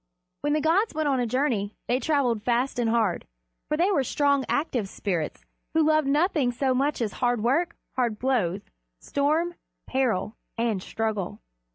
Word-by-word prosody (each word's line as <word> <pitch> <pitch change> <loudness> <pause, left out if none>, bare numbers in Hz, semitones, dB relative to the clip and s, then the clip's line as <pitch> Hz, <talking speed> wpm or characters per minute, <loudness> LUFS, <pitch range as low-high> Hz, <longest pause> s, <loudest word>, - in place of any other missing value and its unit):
When 290 0 +1
the 305 - +2
gods 340 +6 +2
went 310 -1 0
on 270 -2 +2
a 245 - 0
journey 225 -5 0
they 245 +2 +2
traveled 270 -8 +1
fast 245 +3 0
and 235 -2 +2
hard, 220 -6 +1 0.4
for 300 - 0
they 360 +5 +3
were 285 -8 +2
strong, 280 +1 +2
active 250 - 0
spirits 175 -7 -3 0.3
who 320 - +5
loved 310 -2 +3
nothing 295 -3 +2
so 260 +2 +1
much 275 +2 0
as 210 - -2
hard 245 -3 +2
work, 285 +9 +1 0.2
hard 240 -4 0
blows, 210 -7 0 0.4
storm, 310 - 0 0.3
peril, 240 -5 0 0.2
and 230 -4 0
struggle. 215 -3 -3
255 Hz, 165 wpm, -26 LUFS, 225-295 Hz, 0.4 s, who